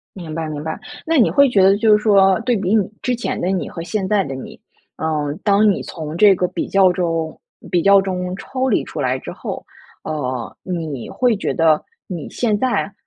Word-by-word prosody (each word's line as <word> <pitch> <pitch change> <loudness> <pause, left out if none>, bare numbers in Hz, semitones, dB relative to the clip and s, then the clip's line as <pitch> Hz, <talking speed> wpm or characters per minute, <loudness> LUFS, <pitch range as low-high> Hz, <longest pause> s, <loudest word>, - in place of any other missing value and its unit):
明 170 -5 -7
白 160 -1 -3
明 150 -1 -5
白， 160 - -4 0.3
那 325 0 +2
你 245 - +4
会 280 -1 +5
觉 200 -6 +3
得 195 +1 +5
就 215 +1 +3
是 210 - -4
说 195 -3 +5
对 245 0 +1
比 195 +1 0
你， 205 -3 +2
之 250 - 0
前 240 - -3
的 180 - -1
你 190 -1 -1
和 165 - -7
现 195 +3 -2
在 200 -1 +2
的 135 - -5
你， 130 - -9 0.4
嗯， 150 -1 -2
当 205 +1 +4
你 195 - -1
从 155 -1 -7
这 205 +1 +6
个 180 -1 0
比 - - -4
较 190 -2 +4
中 165 -3 -2 0.3
比 175 - +2
较 200 +1 +6
中 180 -1 -3
抽 260 +4 -3
离 220 - +2
出 - - -6
来 130 -1 0
之 - - -8
后， - - -6 0.4
呃， 130 -6 -4
你 160 -9 -5
会 245 -4 +1
觉 - - -2
得 160 -2 +3 0.3
你 170 -5 -6
现 220 -4 0
在， 235 -4 0
185 Hz, 230 characters per minute, -19 LUFS, 160-210 Hz, 0.4 s, 这